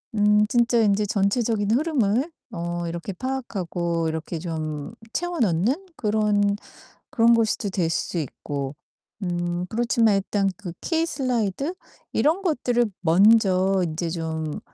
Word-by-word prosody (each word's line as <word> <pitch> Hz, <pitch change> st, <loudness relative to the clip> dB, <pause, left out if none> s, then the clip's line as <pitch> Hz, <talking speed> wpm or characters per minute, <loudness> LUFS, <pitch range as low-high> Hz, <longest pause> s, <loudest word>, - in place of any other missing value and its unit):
음 210 Hz, 0 st, +4 dB
진짜 235 Hz, +1 st, +2 dB
인제 210 Hz, -1 st, +3 dB
전체적인 205 Hz, 0 st, +1 dB
흐름을 265 Hz, 0 st, +1 dB, 0.2 s
어 170 Hz, -1 st, -3 dB
이렇게 170 Hz, +3 st, -4 dB
파악하고 175 Hz, -9 st, -2 dB
이렇게 160 Hz, +1 st, -3 dB
좀 155 Hz, 0 st, -4 dB, 0.2 s
채워 350 Hz, +3 st, -2 dB
넣는 230 Hz, -, +1 dB
그런 210 Hz, -2 st, +2 dB, 0.5 s
그런 235 Hz, 0 st, +4 dB
것으로 225 Hz, -1 st, +1 dB
될 180 Hz, -3 st, 0 dB
수 170 Hz, -, -2 dB
있고 140 Hz, -2 st, -4 dB, 0.5 s
음 175 Hz, -1 st, -2 dB
그렇지만 230 Hz, -2 st, +2 dB
일단 195 Hz, 0 st, 0 dB
그 185 Hz, -5 st, -7 dB
키 325 Hz, -1 st, +1 dB
슬라이드 255 Hz, -, -1 dB, 0.4 s
이런 320 Hz, +6 st, +2 dB
것들을 245 Hz, -9 st, +1 dB, 0.2 s
먼저 190 Hz, +1 st, +4 dB
인제 165 Hz, +2 st, -3 dB
좀 160 Hz, -2 st, -3 dB
205 Hz, 255 characters per minute, -24 LUFS, 170-235 Hz, 0.5 s, 음